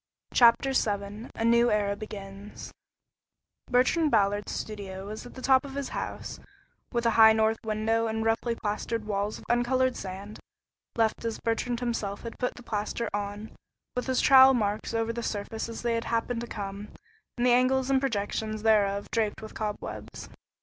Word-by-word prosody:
CHAPTER 240 +3 +5
VII 205 -1 -1
A 225 - -1
NEW 235 +1 +5
ERA 205 -2 +1
BEGINS 200 -1 -9 1.0
Bertrand 260 +6 +3
Ballard's 205 -3 +1
studio 195 -3 -6
was 215 +4 -7
at - - -14
the 260 - -9
top 260 -1 +5
of 275 -1 -8
his 280 -1 -3
house, - - -5 0.5
with 235 -1 -1
a 230 - +4
high 220 0 +7
north 220 0 +2
window 225 +1 0
and 220 0 -2
roughly 225 +1 +1
plastered 215 +1 -3
walls 205 0 -2
of - - -13
uncolored 255 +2 +2
sand, 195 +2 -7 0.6
left 225 -1 +1
as 230 -1 -2
Bertrand 235 +1 -1
himself 215 -5 -3
had 230 - -8
put 250 - -1
the 245 - -12
plaster 215 +1 -3
on, 205 +1 -4 0.4
with 250 - -2
his 260 -1 +2
trowel 265 0 +8
marks 215 0 -1
over 225 0 0
the 235 - -4
surface 220 +1 -4
as 230 - -7
they 235 -1 +1
happened 230 +1 -1
to 235 - -5
come, 200 -1 -6 0.5
and 240 - +1
the 250 - +5
angles 260 +1 +3
and 265 -1 +3
projections 215 -3 -2
thereof 205 -2 +2
draped 220 -3 0
with 220 - -9
cobwebs. 210 -1 -6
225 Hz, 170 wpm, -28 LUFS, 205-240 Hz, 1.0 s, trowel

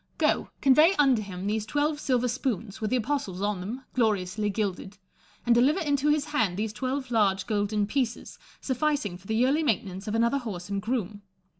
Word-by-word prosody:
Go, - - +1
convey 305 +7 +6
unto 270 -6 +4
him 190 -2 -6
those 215 +1 0
twelve 295 +6 0
silver 250 -4 +1
spoons, 230 -5 -3
with 215 - -1
the 255 - +1
apostles 245 -7 -2
on 205 -2 0
them, 225 +9 -6
gloriously 210 -3 0
gilded; 200 -1 -3 0.5
and 240 - +5
deliver 265 +9 +4
into 290 -3 +1
his 295 -1 +2
hand 225 - 0
these 215 0 -2
twelve 260 +3 -3
large 200 -4 +2
golden 210 -1 0
pieces, 245 +1 -3 0.2
sufficing 270 -7 -1
for 185 +2 -14
the 220 - -1
yearly 260 +7 +3
maintenance 205 - -1
of 215 - -1
another 235 +4 +2
horse 200 -7 -6
and 200 0 -1
groom. 215 -3 -3
225 Hz, 180 wpm, -27 LUFS, 205-270 Hz, 0.5 s, convey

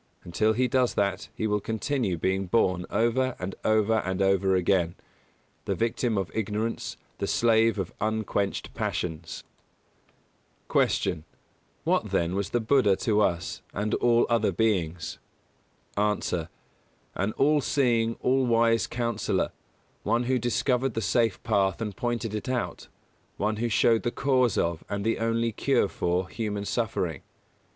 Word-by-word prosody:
Until 110 +6 +1
he 125 +3 +2
does 125 0 +1
that 100 -1 -1
he - - -2
will 105 -1 +1
continue 110 -2 -1
being 95 +3 0
born 90 -3 +1
over 125 +3 +1
and 95 +1 -5
over 110 0 +3
and 95 -2 -3
over 95 -1 +3
again 90 -1 +1 0.7
the - - -1
victim 115 0 0
of 95 -2 -2
ignorance, 110 +1 -2 0.2
the - - -1
slave 115 -1 +3
of 95 -3 -3
unquenched 110 -2 -1
passions. 80 -1 -4 1.3
169. - - +2
Q. 80 - -29 0.4
What, - - +1
then, 85 +1 0
was 100 0 -2
the 120 - +1
Buddha 110 -3 +3
to 105 +1 +1
us, 90 -3 -1
and 105 +2 -1
all 120 -1 +3
other 115 -4 +2
beings? 90 -5 -1 0.8
A. 100 -5 0 0.7
An 100 +3 -1
all 150 +1 +3
seeing, 115 -5 +1
all 130 0 +2
wise 115 -2 +3
Counsellor; 120 -2 -1 0.5
one 120 +1 +1
who 130 +1 +1
discovered 125 +1 0
the 115 - 0
safe 115 0 +1
path 100 -4 +1
and 105 -4 -4
pointed 120 0 -2
it 110 +4 -4
out; 125 -2 -3 0.5
one 105 +1 0
who 120 +2 -1
showed 115 +1 +3
the 120 - 0
cause 130 -3 +1
of, 85 -1 0
and 100 0 -3
the 115 - +1
only 115 +1 0
cure - - +1
for, 90 +2 -1
human 105 -1 -3
suffering. 100 - -2
110 Hz, 145 wpm, -27 LUFS, 95-115 Hz, 1.3 s, over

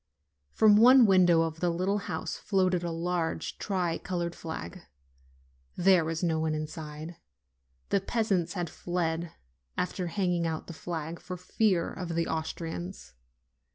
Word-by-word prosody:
From 210 -1 +6
one 250 +2 +8
window 180 -4 +5
of 160 0 -4
the 175 - +1
little 185 +4 0
house 160 -4 -4
floated 185 -3 +1
a 170 - -2
large 165 -1 -2
tri 180 -4 -1
colored 175 -2 -3
flag. 160 - -7 0.9
There 185 -1 +5
was 160 +2 -3
no 160 -2 +1
one 160 -1 0
in 155 0 -2
side: 155 +1 -8 0.7
the 200 - +2
peasants 195 -6 0
had 175 -3 -2
fled, 170 -1 -2 0.5
after 180 0 -2
hanging 175 -2 0
out 160 -1 -3
the 170 - -8
flag, 165 0 -5
for 180 - -7
fear 185 0 +1
of 170 -2 -5
the 165 0 +1
Austrians. 160 - -5
175 Hz, 145 wpm, -29 LUFS, 165-185 Hz, 0.9 s, one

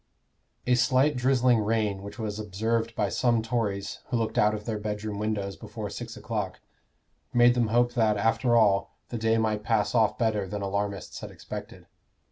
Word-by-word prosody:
A 125 - +3
slight 130 +3 +3
drizzling 125 -2 +3
rain 105 -2 0
which 100 +4 -9
was 110 -2 -4
observed 110 +3 -1
by 105 - +1
some 115 +2 +1
Tories 110 -4 -2
who 125 - 0
looked 115 -1 -1
out 105 0 +4
of 105 0 -7
their 110 -2 -2
bedroom 105 0 -4
windows 105 -2 -2
before - - -7
six - - -7
o'clock, - - -4 0.8
made 120 0 +6
them 120 -2 +1
hope 120 +2 +2
that, 110 -3 +2
after 115 +3 +2
all, 100 -3 +3
the 120 - -4
day 110 0 +2
might 110 -1 0
pass 110 -2 +1
off 110 -3 +3
better 110 -4 0
than 100 +2 -4
alarmists 100 0 -3
had - - -7
expected. - - -9
110 Hz, 175 wpm, -27 LUFS, 105-120 Hz, 0.8 s, made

